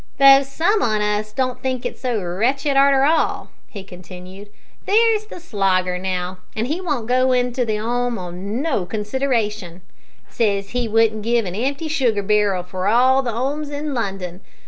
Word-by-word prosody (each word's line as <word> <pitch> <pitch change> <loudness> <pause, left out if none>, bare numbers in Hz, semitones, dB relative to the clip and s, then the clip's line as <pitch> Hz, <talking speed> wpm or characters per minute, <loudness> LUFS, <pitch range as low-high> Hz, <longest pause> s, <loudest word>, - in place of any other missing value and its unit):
"Though 275 0 +8
some 330 +10 0
on 215 -2 +1
us 210 0 -1
don't 255 +2 -2
think 255 -2 -3
it - - -3
so 245 -4 -2
wretched 260 - 0
arter 275 0 +5
all," 320 +3 0 0.2
he 205 -7 -9
continued. 185 +2 -12 0.4
"There's 435 0 +3
the 360 - -9
Slogger, 190 - 0
now, 185 0 -3 0.2
he 270 +11 -2
won't 290 -11 -2
go 255 +2 +2
into 250 0 0
the 215 -2 -1
'ome 240 +2 -1
on 190 +7 -5
no 260 - -1
consideration; 210 -5 -2 0.4
says 200 -3 -1
he 245 +1 -2
wouldn't 220 0 +2
give 230 +1 +1
a - - -3
empty 275 - -2
sugar 245 -9 0
barrel 205 -3 +1
for 185 +1 -4
all 255 +5 +4
the 245 -3 -3
'omes 280 +6 -3
in 290 0 -4
London. 195 -6 -4
230 Hz, 165 wpm, -20 LUFS, 200-270 Hz, 0.4 s, Though